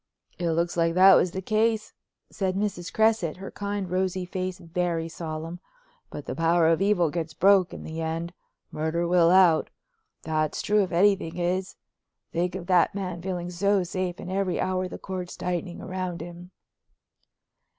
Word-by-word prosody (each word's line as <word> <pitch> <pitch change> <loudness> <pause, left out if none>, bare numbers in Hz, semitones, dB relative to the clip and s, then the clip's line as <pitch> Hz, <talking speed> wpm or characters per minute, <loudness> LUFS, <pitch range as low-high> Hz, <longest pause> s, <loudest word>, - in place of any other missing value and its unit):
"It 175 -1 0
looks 170 +1 0
like 165 -1 +1
that 190 +1 +8
was 185 - +4
the 190 +2 -6
case," 220 +1 +1 0.4
said 190 -2 -1
Mrs. 195 -3 -2
Cresset, 220 -8 +2
her 195 +1 -8
kind, 200 -1 -3
rosy 185 0 -1
face 185 0 -4
very 170 -2 -2
solemn. 165 +1 -6 0.5
"But 145 - -8
the - - -4
power 165 +3 +3
of 165 +2 +2
evil 190 -6 +2
gets 160 -2 -4
broke 195 0 +4
in - - -8
the 160 +1 -5
end. 165 +2 -3 0.4
'Murder 160 +3 -1
will 170 -1 +4
out'—that's 175 - +1
true 210 0 +3
if 190 - -2
anything 180 -2 +2
is. 180 +2 -1 0.6
Think 175 +2 -1
of 185 -2 -5
that 180 +1 +3
man 180 -3 -4
feeling 180 -1 -4
so 200 +2 +2
safe 180 0 -3
and 185 - -6
every 190 -2 0
hour 185 0 0
the - - -7
cords 185 -2 -6
tightening 180 0 -3
round 185 -2 -4
him." 175 +1 -9
180 Hz, 160 wpm, -26 LUFS, 170-190 Hz, 0.6 s, that